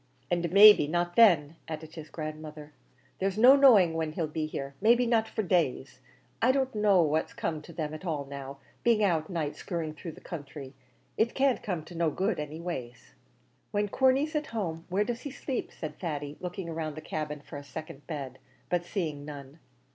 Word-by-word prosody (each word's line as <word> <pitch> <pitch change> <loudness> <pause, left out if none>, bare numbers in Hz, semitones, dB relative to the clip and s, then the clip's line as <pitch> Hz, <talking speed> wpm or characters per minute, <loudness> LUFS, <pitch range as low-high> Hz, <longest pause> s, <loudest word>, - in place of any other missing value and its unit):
"And, 170 -1 0
maybe, 205 -5 +9
not 175 +2 -1
then," 165 -9 +5
added 160 0 -7
his 155 -2 -9
grandmother. 155 -1 -7 0.5
"There's 195 +1 -1
no 250 +5 +8
knowing 225 -12 +6
when 160 -1 -2
he 170 - -3
'll - - +1
be 155 0 -3
here; 140 -2 -5
maybe 235 +3 +5
not 230 -2 +2
for 220 - -3
days. 140 -8 0 0.4
I 250 - +5
don't 265 0 0
know 205 -4 +4
what's 155 +1 0
come 155 -2 -3
to 160 - -12
them 155 -2 -4
at 155 - -8
all 155 -6 -2
now 140 0 -8 0.3
being 230 -3 +3
out 165 -5 +1
night 160 -5 -2
skirring 165 -4 -4
through 160 +1 -8
the - - -13
counthry; 140 -4 -8 0.4
it 225 +2 +1
can't 270 -2 +2
come 175 -6 -3
to 175 - -11
no 165 -1 +1
good, 190 +5 -1
any 150 +1 -5
ways." 125 - -6 0.6
"When 205 0 -1
Corney's 270 - +2
at 300 0 -1
home, 170 -7 -4
where 195 +3 +2
does 235 +2 -4
he 285 - -5
sleep?" 265 -1 -4
said 155 - -7
Thady, 145 -4 -4
looking 180 -1 -5
round 155 -2 -4
the - - -5
cabin 150 -1 -4
for 145 - -10
a 145 - -8
second 145 -1 -9
bed, 135 -5 -6 0.3
but 175 -1 +1
seeing 165 -6 -3
none. 145 0 -10
165 Hz, 195 wpm, -29 LUFS, 150-205 Hz, 0.6 s, maybe